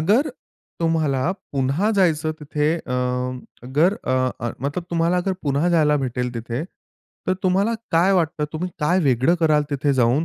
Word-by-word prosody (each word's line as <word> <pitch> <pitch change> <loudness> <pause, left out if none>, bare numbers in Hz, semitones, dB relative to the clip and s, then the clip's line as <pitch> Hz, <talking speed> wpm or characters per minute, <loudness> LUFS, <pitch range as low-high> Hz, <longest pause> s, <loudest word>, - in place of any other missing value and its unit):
अगर, 215 - +3 0.5
तुम्हाला 160 -2 +1 0.2
पुन्हा 140 +10 +1
जायचं 160 -4 +2
तिथे, 150 +1 0
अ, 135 -6 -6 0.7
अगर 160 +9 +3
अ, - - -2 0.3
अ 120 - -2
मतलब 145 +6 -3
तुम्हाला 170 +1 +1
अगर 190 +2 0
पुन्हा 145 +4 +1
जायला 150 -3 +3
भेटेल 125 -2 -2
तिथे, 115 +4 -3 0.6
तर 185 - +2
तुम्हाला 195 +5 +2 0.2
काय 175 +4 +4
वाटतं 160 -4 +1
तुम्ही 175 +3 -3
काय 175 +5 +3
वेगळं 130 +4 +3
कराल 155 -2 +4
तिथे 140 0 +1
जाऊन 125 +5 +3
155 Hz, 150 wpm, -22 LUFS, 140-175 Hz, 0.7 s, काय